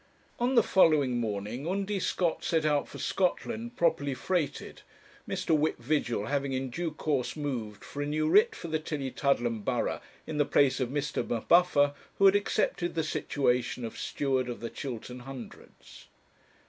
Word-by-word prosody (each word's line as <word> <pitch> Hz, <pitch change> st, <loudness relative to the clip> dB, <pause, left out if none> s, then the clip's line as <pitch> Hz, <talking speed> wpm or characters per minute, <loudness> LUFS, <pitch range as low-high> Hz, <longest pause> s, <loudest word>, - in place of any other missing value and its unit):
On 245 Hz, +2 st, +1 dB
the 235 Hz, -, +6 dB
following 145 Hz, -9 st, +4 dB
morning 110 Hz, +5 st, -3 dB
Undy 195 Hz, +2 st, -1 dB
Scott 175 Hz, -2 st, 0 dB
set 160 Hz, -2 st, +1 dB
out 145 Hz, -2 st, +2 dB
for -, -, -10 dB
Scotland, 230 Hz, +5 st, -1 dB
properly 160 Hz, -5 st, +1 dB
freighted, 155 Hz, +1 st, -2 dB, 0.5 s
Mr. 160 Hz, -, +1 dB
Whip 155 Hz, +1 st, +1 dB
Vigil 120 Hz, -9 st, -1 dB
having 140 Hz, +1 st, -1 dB
in 130 Hz, -1 st, -2 dB
due 170 Hz, +5 st, -2 dB
course 150 Hz, -4 st, -1 dB
moved 125 Hz, -9 st, -4 dB
for 145 Hz, -, -6 dB
a 145 Hz, -, -1 dB
new 155 Hz, +1 st, 0 dB
writ 445 Hz, -, +5 dB
for 170 Hz, -, -7 dB
the 160 Hz, -1 st, -1 dB
Tillietudlem 135 Hz, -6 st, -1 dB
borough -, -, -1 dB, 0.2 s
in 150 Hz, -, -4 dB
the -, -, +6 dB
place 140 Hz, -1 st, +3 dB
of 130 Hz, -2 st, 0 dB
Mr. 145 Hz, +1 st, -1 dB
M'Buffer, 145 Hz, +3 st, +3 dB, 0.2 s
who 195 Hz, -, +4 dB
had 195 Hz, +1 st, +7 dB
accepted 200 Hz, -4 st, 0 dB
the 160 Hz, -, +1 dB
situation 125 Hz, -5 st, 0 dB
of 115 Hz, -, -6 dB
Steward 130 Hz, -3 st, -1 dB
of 120 Hz, -, -5 dB
the 115 Hz, -, -5 dB
Chiltern 125 Hz, -1 st, -6 dB
Hundreds. 130 Hz, -1 st, -11 dB
145 Hz, 160 wpm, -29 LUFS, 125-170 Hz, 0.5 s, had